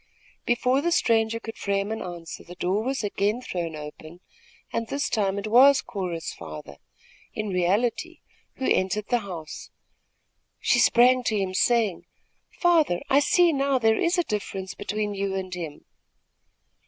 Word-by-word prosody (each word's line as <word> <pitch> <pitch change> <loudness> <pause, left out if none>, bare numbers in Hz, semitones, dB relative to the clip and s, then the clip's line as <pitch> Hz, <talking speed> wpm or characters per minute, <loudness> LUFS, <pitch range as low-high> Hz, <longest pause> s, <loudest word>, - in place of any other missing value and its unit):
Before 250 +3 +2
the 345 - 0
stranger 225 -7 +2
could 225 0 -9
frame 200 +1 -1
an 220 - -3
answer, 175 -2 -7
the 175 - -11
door 185 +4 0
was 265 0 -2
again 205 +2 0
thrown 170 -9 -4
open, 155 +3 -10 0.5
and 230 - -2
this 280 +5 -1
time 200 -3 0
it 200 - -4
was 265 +5 +6
Cora's 175 -4 -4
father, 75 -2 -9 0.6
in 215 -1 -3
reality, 210 - 0 0.4
who 265 - -4
entered 190 +3 0
the 245 - +2
house. 175 -7 -8 0.9
She - - +2
sprang 250 +2 +5
to 220 - +1
him, 190 -2 -2
saying: 220 -2 +1 0.4
"Father, 325 - +2
I 275 - +6
see 345 +3 +4
now 275 -1 +1
there 225 -2 +2
is 345 +2 +1
a 350 - +3
difference 195 - -4
between 210 0 -3
you 195 -1 -2
and 185 -1 -4
him!" 165 -4 -7
210 Hz, 155 wpm, -25 LUFS, 185-250 Hz, 0.9 s, was